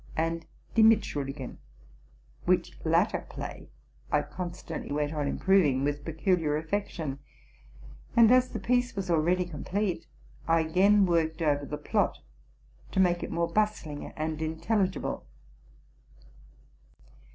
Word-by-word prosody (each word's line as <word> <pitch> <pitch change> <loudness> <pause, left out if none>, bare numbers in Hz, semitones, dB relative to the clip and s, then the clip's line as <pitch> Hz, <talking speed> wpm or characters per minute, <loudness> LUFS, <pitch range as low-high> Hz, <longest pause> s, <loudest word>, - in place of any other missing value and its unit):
and 165 +1 -1
'* - - -32
Die 225 - +5
Mitschuldigen,'' 145 - +2 0.9
which - - +2
latter - - +2
play - - -7 0.4
I - - +3
con 180 -1 -5
stantly 170 -3 -7
went 145 +1 -1
on 150 -2 -1
improving 150 -6 +3
with 145 0 -1
peculiar 160 -1 +1
affection; 160 -4 -3 1.0
and, 230 -1 +8
as 255 0 +5
the - - -5
piece 245 -1 +1
was 190 -3 -2
already 175 +3 +2
complete, 180 +3 -3 0.4
I 165 0 +4
again 195 +5 +4
worked 165 -1 +1
over 145 -2 +1
the 150 - -4
plot, 150 - 0 0.8
to - - +1
make 175 -2 +3
it - - -4
more 170 0 -1
bustling 210 -9 0
and 155 0 -3
intelligible. 185 - -1
165 Hz, 125 wpm, -29 LUFS, 150-195 Hz, 1.0 s, and